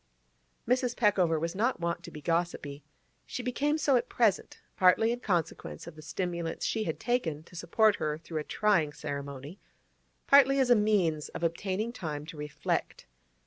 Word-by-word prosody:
Mrs. 250 0 +1
Peckover 185 -7 +3
was 165 +2 -2
not 230 +4 0
wont 170 0 -2
to - - -9
be 150 - -10
gossipy. 165 -4 -2 0.4
She 250 - -5
became 285 +5 0
so 280 -4 +3
at 240 +1 -2
present, 220 -5 +1 0.2
partly 190 +5 +4
in 240 - -2
consequence 170 - -2
of - - -10
the 155 - -11
stimulants 170 +1 -3
she 220 -1 -1
had 160 - -3
taken 170 -12 -1
to 175 - -17
support 215 +5 +2
her 150 -1 -2
through 160 0 -5
a - - -3
trying 170 -6 +1
ceremony, 140 +3 -6 0.7
partly 275 -1 +6
as 260 -2 +3
a - - +8
means 195 -8 +1
of - - -7
obtaining 190 +7 -1
time 150 -9 -5
to 165 +1 -9
reflect. 150 0 -3
175 Hz, 170 wpm, -30 LUFS, 155-230 Hz, 0.7 s, a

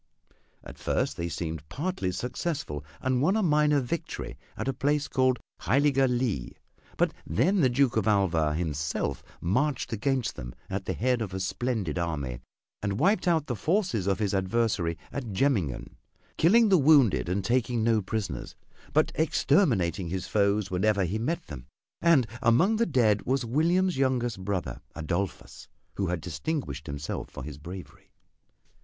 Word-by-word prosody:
At - - -11
first 75 - 0
they 85 0 -3
seemed 80 -3 -5
partly 150 - -2
successful 125 - -3 0.2
and 130 -1 +1
won 185 +8 +3
a 220 - +1
minor 150 -3 +4
victory 135 +6 -4 0.2
at - - -3
a 135 - +1
place 145 +3 0
called 130 -1 +2 0.2
Heiliger 135 +1 +3
Lee, 120 - -1 0.4
but - - +2
then 180 - +2
the 130 - +4
Duke 125 -1 +2
of 110 -1 +1
Alva 85 -7 +2
himself 75 -3 -2 0.2
marched 125 - 0
against 120 +1 0
them - - -8 0.2
at 95 0 -3
the - - -1
head 125 0 +1
of 95 -4 -4
a - - -2
splendid 95 - -2
army, 70 -8 -3 0.4
and 100 -1 -1
wiped 195 - +2
out 165 -4 +3
the 125 - -3
forces 155 - 0
of 100 -2 +2
his 105 -1 -1
adversary 95 -4 0
at 125 -7 -5
Jemmingen, 95 - 0 0.4
killing 220 +7 +5
the 190 -3 +5
wounded 140 - +5
and 95 +1 -1
taking 120 -1 +1
no 115 -1 +3
prisoners, 95 - -4 0.4
but 155 +2 +3
exterminating 125 - +2
his 90 +2 -3
foes 100 -1 +1
wherever 100 +2 +2
he 100 +6 -2
met 165 +9 -2
them. 65 -5 -9 0.3
And 165 -7 +5 0.2
among 165 - +4
the 235 - +2
dead 110 -8 +3
was 130 0 +1
William's 170 +8 +2
youngest 120 -7 0
brother, 95 -2 -3
Adolphus, 85 +5 -4 0.3
who 95 - -1
had 90 -2 -2
distinguished 90 - -4
himself 70 0 -4
for - - -8
his 75 -1 -8
bravery. 95 +4 -10
110 Hz, 155 wpm, -28 LUFS, 90-140 Hz, 0.4 s, killing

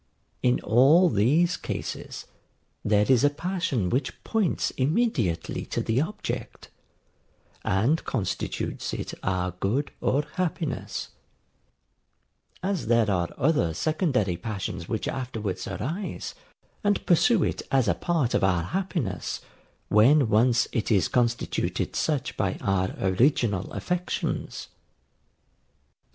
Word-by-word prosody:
In 125 -1 +3
all 140 - +5
these 150 - +3
cases - - -5 0.6
there 105 0 +3
is 130 -3 +4
a 145 - +6
passion 160 - -1
which 130 +2 -2
points 215 -7 0
immediately 135 - 0
to - - -2
the 115 +4 +1
object, 210 +7 -5 0.9
and 115 +12 +2
constitutes 110 -7 -3
it - - -5
our 90 -1 -1
good 125 +9 0
or 140 +3 +2
happiness; 170 -5 -2 1.5
as 190 - -1
there 115 -3 +3
are 85 -3 0
other 125 - +2
secondary 130 - 0
passions 95 -3 -5
which 110 - -2
afterwards 115 -7 -3
arise, 180 +8 -4 0.5
and 205 -1 +1
pursue 185 +3 +4
it - - -1
as 135 -3 +3
a - - +4
part 160 -8 0
of - - +2
our 90 -3 +2
happiness, 165 - -2 0.5
when 125 +4 +5
once 115 +3 +4
it 115 -2 -1
is 100 -4 +4
constituted 120 -1 0
such 145 -4 -1
by 95 -2 -1
our 95 -1 +1
original 100 0 +2
affections. 180 0 -3
125 Hz, 110 wpm, -26 LUFS, 100-160 Hz, 1.5 s, a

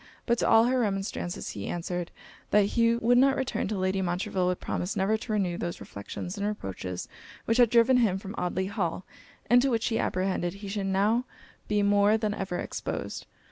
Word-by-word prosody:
But 235 -1 +1
to - - +1
all 225 - +6
her 255 +2 +2
remonstrances, 195 -4 -2
he 100 - -6
answered 175 0 -3 0.4
'That 210 -1 +4
he 230 0 +3
would 240 +1 +3
not 270 +1 +5
return, 265 -6 -1
till 210 0 -2
Lady 190 +1 0
Montreville 185 +1 -1
would 180 0 0
promise 180 +5 -3
never 200 +2 +2
to 220 0 -4
renew 185 -4 0
those 175 0 -4
reflections 180 - -7
and 200 - 0
reproaches 95 - -5 0.4
which 230 +2 +1
had 240 -2 +6
driven 235 +2 +5
him 215 -6 +2
from 195 +1 -7
Audley 180 -1 -1
Hall; 190 -3 -2 0.4
and 245 +2 +6
to 270 - +2
which 230 -3 0
he 225 - 0
apprehended 185 -1 -1
he 200 0 -8
should 195 0 -2
now 210 +6 +2 0.4
be 210 -1 +1
more 205 +1 +4
than 215 -1 -1
ever 190 -3 -3
exposed.' - - -5
200 Hz, 195 wpm, -28 LUFS, 185-230 Hz, 0.4 s, all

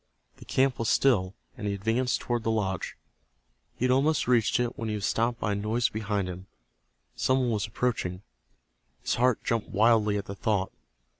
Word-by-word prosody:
The - - -13
camp 130 -2 +1
was 115 - 0
still, 100 -9 +2 0.2
and 105 - -5
he 100 - -1
advanced 115 +5 0
toward 120 -1 -1
the 115 - -2
lodge. 100 -5 -2 0.8
He 125 - -1
had 125 - +3
almost 140 +3 +2
reached 120 -3 +3
it 120 -1 -1
when 115 -1 -4
he 105 - -1
was 105 -1 -3
stopped 115 +2 0
by 105 - -1
a - - 0
noise 110 +4 0
behind 105 -3 -2
him. 90 +1 -7 0.7
Some 130 - +2
one 125 -2 +1
was 110 -1 -1
approaching. 100 -5 -2 0.8
His - - 0
heart 125 -1 +2
jumped 115 -3 -1
wildly 105 -1 +3
at 100 - -4
the 100 - -6
thought. 100 -1 -1
110 Hz, 190 wpm, -28 LUFS, 100-120 Hz, 0.8 s, had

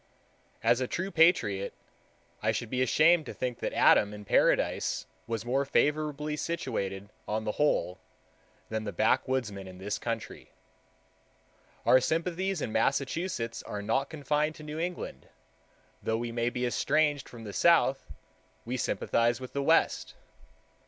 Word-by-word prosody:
As 120 +2 +3
a 130 - 0
true 185 +7 -3
patriot, 160 - +3 0.7
I 110 - +2
should 110 +1 -4
be 130 0 0
ashamed 155 +5 +4
to - - -7
think 125 -2 -3
that - - -2
Adam 105 0 +4
in 105 0 -10
paradise - - +2 0.2
was 115 -1 -3
more 135 +3 +1
favorably 150 +1 0
situated 100 - -3 0.2
on 110 +1 -1
the 105 - -1
whole 105 -9 0 0.7
than 110 -1 -2
the 105 - -4
backwoodsman 110 0 0
in 90 -1 -10
this 100 +2 -3
country. 115 -2 -5 1.4
Our 130 - +6
sympathies 175 +4 -1
in - - -3
Massachusetts 135 +1 -1
are 105 0 -6
not 135 +6 0
confined 150 0 -1
to 155 - -11
New 150 +1 -6
England; 175 - -5 0.7
though 110 - 0
we 120 0 -3
may 120 0 0
be 125 0 -2
estranged 145 +3 +1
from 115 -2 -11
the 105 -2 -7
South, 165 -4 +3 0.5
we 125 +2 -2
sympathize 115 +2 +1
with 130 -1 -9
the 140 - -1
West. 160 +4 +2
130 Hz, 145 wpm, -29 LUFS, 110-150 Hz, 1.4 s, Our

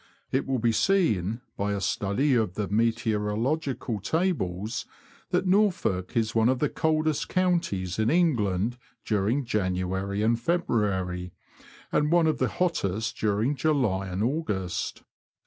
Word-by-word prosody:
It 130 - 0
will 135 -1 +1
be 115 0 +2
seen, 115 - +1
by 100 +1 -1
a 100 - -1
study 100 +9 +1
of 110 -6 +1
the 105 -2 -2
meteorological 115 +4 0
tables, 110 - -1 0.4
that - - +1
Norfolk 180 - +1
is 110 -2 +1
one 115 +1 +3
of 130 - +2
the 150 +2 +1
coldest 155 -1 0
counties 165 - 0
in 110 +1 +2
England 120 - +1 0.3
during 110 +6 +1
January 95 -1 -1
and 115 +1 +2
February, 100 - -1 0.6
and 150 +1 +2
one 170 -1 +4
of 155 - +1
the - - +2
hottest 110 - -1
during 110 +6 +1
July 125 -10 +1
and 95 +3 -2
August. 110 - -2
115 Hz, 130 wpm, -27 LUFS, 100-150 Hz, 0.6 s, one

